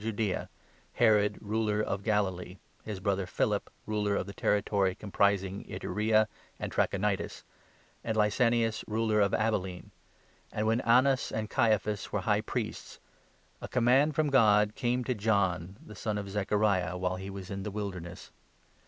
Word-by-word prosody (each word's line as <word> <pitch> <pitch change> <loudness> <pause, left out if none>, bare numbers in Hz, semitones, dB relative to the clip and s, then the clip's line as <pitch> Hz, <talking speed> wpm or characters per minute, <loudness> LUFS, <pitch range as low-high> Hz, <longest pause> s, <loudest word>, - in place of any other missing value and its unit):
Judaea, 110 -2 -2 0.4
Herod 105 -3 +3
Ruler 105 0 0
of 100 -2 -1
Galilee, 95 -3 -1 0.3
his 105 -3 -5
brother 95 -1 -1
Philip - - -1 0.2
Ruler 105 -1 0
of - - -1
the 100 - -8
territory 100 -1 +1
comprising 100 -1 0
Ituraea 110 +1 +1 0.3
and - - -4
Trachonitis, 100 0 -1 0.6
and 110 -1 -2
Lysanias 115 +1 +2
Ruler 110 -1 +1
of 100 -1 +3
Abilene, 95 -5 -2 0.6
and 105 - -2
when 115 +3 +2
Annas 130 +3 +3
and 110 0 -3
Caiaphas 105 -3 +1
2 - - -11
were - - 0
High - - +1
Priests, - - -5 0.6
a - - -5
Command 130 +5 +3
from 150 -1 +1
God 105 -5 +5
came 125 +1 0
to 125 - -1
John, 100 -4 0
the 105 - -11
son 105 0 -3
of 100 -1 -5
Zechariah, 100 -3 +1
while 90 0 -1
he 95 +1 -7
was 95 -1 -8
in 100 0 -4
the 105 - -4
Wilderness. 95 -4 -6
105 Hz, 150 wpm, -30 LUFS, 100-110 Hz, 0.6 s, God